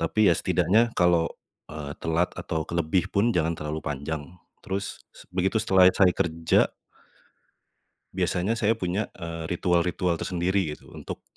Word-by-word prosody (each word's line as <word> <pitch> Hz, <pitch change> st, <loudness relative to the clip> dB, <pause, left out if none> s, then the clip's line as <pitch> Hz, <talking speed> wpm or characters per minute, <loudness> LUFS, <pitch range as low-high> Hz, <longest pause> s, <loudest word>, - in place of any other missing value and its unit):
tapi 95 Hz, +4 st, +3 dB
ya -, -, +4 dB
setidaknya 115 Hz, +4 st, +2 dB
kalau, 85 Hz, -2 st, +3 dB, 0.4 s
eee, 75 Hz, -2 st, -6 dB
telat 80 Hz, +2 st, +1 dB
atau 80 Hz, -1 st, -2 dB
kelebih 85 Hz, +3 st, 0 dB
pun 105 Hz, +2 st, +2 dB
jangan 80 Hz, -1 st, +1 dB
terlalu 75 Hz, +1 st, -4 dB
panjang. 75 Hz, +1 st, -3 dB, 0.4 s
Terus 95 Hz, +1 st, -4 dB
se -, -, -15 dB
begitu 95 Hz, +4 st, 0 dB
setelah 95 Hz, -3 st, +6 dB
saya 90 Hz, -3 st, +4 dB
kerja 85 Hz, -3 st, +1 dB, 1.4 s
biasanya 100 Hz, +6 st, 0 dB
saya 110 Hz, 0 st, +2 dB
punya, 95 Hz, 0 st, -2 dB
eee, 85 Hz, -2 st, -6 dB
ritual-ritual 90 Hz, 0 st, 0 dB
tersendiri 90 Hz, -2 st, -1 dB
gitu, -, -, -18 dB
untuk -, -, -8 dB
90 Hz, 135 wpm, -26 LUFS, 80-95 Hz, 1.4 s, setelah